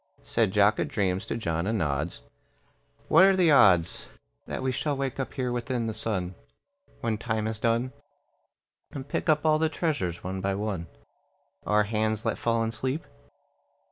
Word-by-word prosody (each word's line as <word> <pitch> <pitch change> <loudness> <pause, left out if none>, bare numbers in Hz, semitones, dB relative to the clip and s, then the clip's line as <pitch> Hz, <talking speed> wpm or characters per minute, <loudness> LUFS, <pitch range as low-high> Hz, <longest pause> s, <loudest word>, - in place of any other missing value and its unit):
Said 115 -5 +1
Jock 105 +2 +4
a - - +1
dreams 100 -10 -1
to - - -2
John 85 -4 -2
a - - +1
nods, 80 -6 -2 0.8
"What 165 +4 +7
are 195 0 +6
the 175 -4 +4
odds 90 - +4 0.4
That - - -4
we 130 - +1
shall 145 +3 -1
wake 135 -1 -3
up 135 - -4
here 125 -3 -1
within 120 0 -2
the 110 - -2
sun, 95 -5 -2 0.7
When 110 -2 -1
time 110 -2 -1
is 110 0 -3
done, 120 +3 0 1.0
And 135 -1 -7
pick - - -2
up 150 0 +3
all 155 0 +4
the 160 0 +2
treasures 120 - -2
one 95 +1 -4
by 95 0 0
one 100 -5 -3 0.8
Our 105 0 +4
hands 110 0 -1
let - - -1
fall 115 -1 +1
in 115 - -1
sleep?" 130 +7 -3
110 Hz, 170 wpm, -27 LUFS, 100-130 Hz, 1.0 s, What